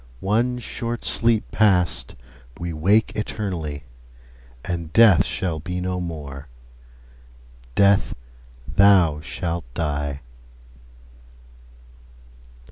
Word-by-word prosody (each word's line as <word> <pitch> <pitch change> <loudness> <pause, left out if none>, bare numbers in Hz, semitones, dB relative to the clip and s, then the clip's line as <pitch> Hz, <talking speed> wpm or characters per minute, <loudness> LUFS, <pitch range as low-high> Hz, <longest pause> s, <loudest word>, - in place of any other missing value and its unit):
One 115 - 0
short 120 0 -5
sleep 115 -2 +1
past, 90 - +2 0.4
we 85 -1 -4
wake 100 +8 +2
eternally, 90 -9 -4 0.8
And 85 -3 -4
Death 110 -6 +6
shall 85 -4 -3
be 90 +4 -4
no 90 0 -2
more: 75 -5 -7 1.3
Death, 100 0 +3 0.5
thou 95 -6 +4
shalt 75 +2 -5
die! 70 -3 -2
90 Hz, 80 wpm, -22 LUFS, 75-100 Hz, 1.3 s, Death